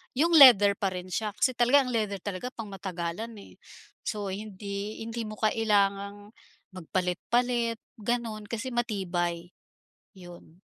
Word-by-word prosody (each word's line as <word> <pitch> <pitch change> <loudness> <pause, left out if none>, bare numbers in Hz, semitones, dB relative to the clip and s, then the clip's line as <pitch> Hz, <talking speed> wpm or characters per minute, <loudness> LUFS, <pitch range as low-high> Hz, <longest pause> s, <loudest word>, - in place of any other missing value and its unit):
yung 325 +6 +2
leather 240 -10 +9
pa 195 - +1
rin 180 0 -7
siya," 215 +4 -1
kasi 255 - +2
talaga 245 +4 +4
ang 250 - -4
leather 210 -3 -1
talaga 205 +4 -4
pang 225 - -6
matagalan, 185 +2 -5
eh. 200 - -13 0.5
So, 205 -3 -3
hindi 200 +1 -6
hindi 230 +1 -5
mo 215 - -7
kailangang 205 -2 0 0.4
magpalit-palit 230 +7 -1 0.2
gano'n 220 -1 -3
kasi 240 +4 -4
matibay, 175 -7 -2 0.6
yun. 175 -2 -14
205 Hz, 130 wpm, -28 LUFS, 190-230 Hz, 0.6 s, leather